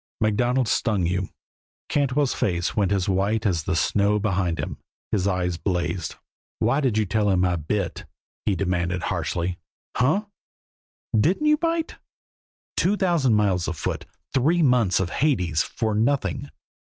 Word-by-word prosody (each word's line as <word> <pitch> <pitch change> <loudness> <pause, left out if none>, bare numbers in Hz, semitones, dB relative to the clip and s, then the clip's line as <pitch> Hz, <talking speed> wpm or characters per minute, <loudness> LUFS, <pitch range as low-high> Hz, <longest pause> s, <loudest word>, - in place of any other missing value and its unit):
MacDonald 120 +4 +1
stung 105 -5 +1
you." 90 +2 -1 0.6
Cantwell's 140 -1 +1
face 85 -3 -1
went 100 -3 +1
as 95 -2 +1
white 100 +4 +1
as 85 -6 +1
the - - 0
snow 100 +5 +2
behind 95 -5 0
him, - - -4 0.3
his 100 -2 +1
eyes 90 -2 0
blazed. 85 0 -2 0.4
"Why 130 +6 +2
did 125 -6 +1
you 110 - +2
tell 105 +2 +1
him 95 -1 +3
I 90 -1 +1
bit?" 85 +3 -3 0.4
he 100 - +3
demanded 90 -1 -1
harshly. 90 -1 -2 0.4
"Hunh! 155 +12 +2 0.9
Didn't 170 - +2
you 300 0 +5
bite? 330 0 -1 0.8
Two 200 +3 +2
thousand 170 - +2
miles 95 -5 +1
afoot; 80 -2 -3 0.3
three 155 +6 +3
months 125 -8 +3
of 90 -2 -1
Hades; 90 - +1
for 110 +3 -2
nothing. 135 +4 0
105 Hz, 140 wpm, -24 LUFS, 90-130 Hz, 0.9 s, you